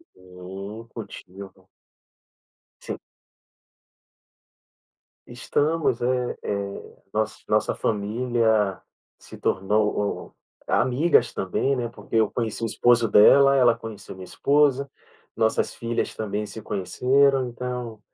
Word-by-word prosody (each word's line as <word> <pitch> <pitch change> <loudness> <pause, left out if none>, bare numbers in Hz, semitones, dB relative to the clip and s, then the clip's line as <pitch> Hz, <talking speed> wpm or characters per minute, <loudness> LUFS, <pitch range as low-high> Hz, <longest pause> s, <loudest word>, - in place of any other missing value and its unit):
Hum, 95 +5 -9
cultivo. 95 -2 -11 1.1
Sim. - - -5 2.3
Estamos, 155 -5 0
eh 125 0 0
eh, 100 -1 -5 0.2
noss - - -2
nossa - - +1
família 110 -1 0 0.4
se - - -13
tornou 105 +1 -1 0.3
amigas 130 +1 +2
também, 115 +8 0
né, 120 -2 -2
porque 115 - -9
eu 110 -2 +3
conheci 115 -2 -3
o - - +1
esposo 120 0 +3
dela, 135 +7 +6
ela 120 -3 +5
conheceu 110 -3 -9
minha 95 - -10
esposa, 140 +3 +2 0.5
nossas - - +1
filhas 115 0 -3
também 105 -1 -3
se 110 +1 -8
conheceram, 130 +7 +2
então 120 -2 -5
115 Hz, 100 wpm, -24 LUFS, 100-125 Hz, 2.3 s, dela